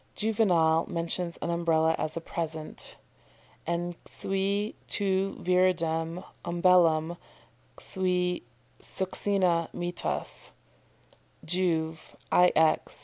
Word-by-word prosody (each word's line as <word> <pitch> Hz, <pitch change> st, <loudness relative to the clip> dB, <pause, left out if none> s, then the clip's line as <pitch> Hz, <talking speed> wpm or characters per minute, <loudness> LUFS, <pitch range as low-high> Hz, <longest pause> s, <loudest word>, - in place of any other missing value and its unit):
"] -, -, -37 dB
Juvenal 180 Hz, -7 st, +2 dB
mentions 170 Hz, +1 st, -2 dB
an 170 Hz, -, -1 dB
Umbrella 165 Hz, -1 st, +2 dB
as 155 Hz, -, -2 dB
a -, -, -3 dB
present: 160 Hz, -2 st, -5 dB, 0.7 s
"En 175 Hz, +1 st, -1 dB
cui 200 Hz, +2 st, -1 dB
tu 195 Hz, -1 st, 0 dB
viridem 175 Hz, -2 st, +1 dB, 0.2 s
umbellam 170 Hz, -2 st, +3 dB, 0.6 s
cui 180 Hz, -2 st, -1 dB, 0.4 s
succina 185 Hz, -3 st, +1 dB
mittas" 175 Hz, 0 st, -3 dB, 0.9 s
Juv., 160 Hz, -2 st, -1 dB, 0.2 s
ix. 160 Hz, -3 st, +3 dB
175 Hz, 85 wpm, -28 LUFS, 165-185 Hz, 0.9 s, umbellam